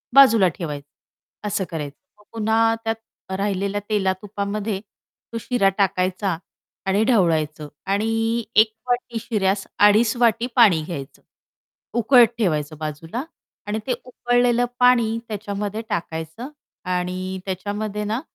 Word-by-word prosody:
बाजूला 230 -8 +8
ठेवायचे 145 -4 -5 0.6
असं 200 -1 0
करायचं. 150 -4 -5 0.2
मग - - -20
पुन्हा 225 +1 +2
त्यात 225 -3 -6
राहिलेल्या 200 0 -1
तेला-तुपामध्ये 200 +1 -1
तो 225 +2 -13
शिरा 220 -6 +2
टाकायचा 185 -2 +1 0.5
आणि 200 +3 +2
ढवळायचं 160 - +2 0.2
आणि 225 +3 0
1 215 0 +5 0.2
वाटी 245 -2 -1
शिऱ्यास 200 -4 0
अडीच 215 +3 +5
वाटी 235 0 +3
पाणी 200 -10 +6
घ्यायचं 145 -5 -7 0.8
उकळत 240 0 +7
ठेवायचं 155 -7 0
बाजूला 160 - -5 0.4
आणि 215 +1 -1
ते 250 - +2
उकळलेलं 245 -1 +2
पाणी 235 -3 +4
त्याच्यामध्ये 210 0 -4
टाकायचं 165 - -4 0.4
आणि 185 +1 -2
त्याच्यामध्ये 205 +2 -3
ना, 220 +4 -2
205 Hz, 110 wpm, -22 LUFS, 185-225 Hz, 0.8 s, बाजूला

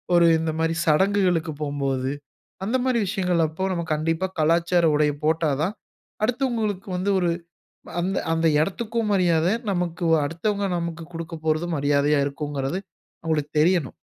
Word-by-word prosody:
ஒரு 170 0 +6
இந்த 160 0 -1
மாதிரி 165 0 +1
சடங்குகளுக்கு 180 0 +2
போம்போது, 135 -2 -1 0.5
அந்தமாரி 255 +2 +1
விஷயங்கள் 180 -3 +1
அப்போ 160 +5 -3
நம்ம 170 -1 -2
கண்டிப்பா 165 +4 0
கலாச்சார 170 +2 +3
உடைய 150 0 +2
போட்டாதான், 160 +3 +1 0.5
அடுத்தவங்களுக்கு 225 -6 -1
வந்து 195 +3 0
ஒரு 175 -2 +1 0.6
அ - - -10
அந்த 190 +2 -1 0.2
அந்த 165 0 +2
இடத்துக்கும் 220 +6 -1
மரியாத, 170 -4 +3 0.2
நமக்கு 175 -2 -2 0.2
அடுத்தவங்க 200 +6 -1
நமக்கு 170 -1 -4
குடுக்கப்போறதும் 165 0 -2
மரியாதையா 145 +1 +2
இருக்கும்ங்கிறது, 145 +2 -3 0.4
அவுங்களுக்கு 155 -3 -1
தெரியணும். 170 -4 +2
165 Hz, 125 wpm, -24 LUFS, 155-190 Hz, 0.6 s, ஒரு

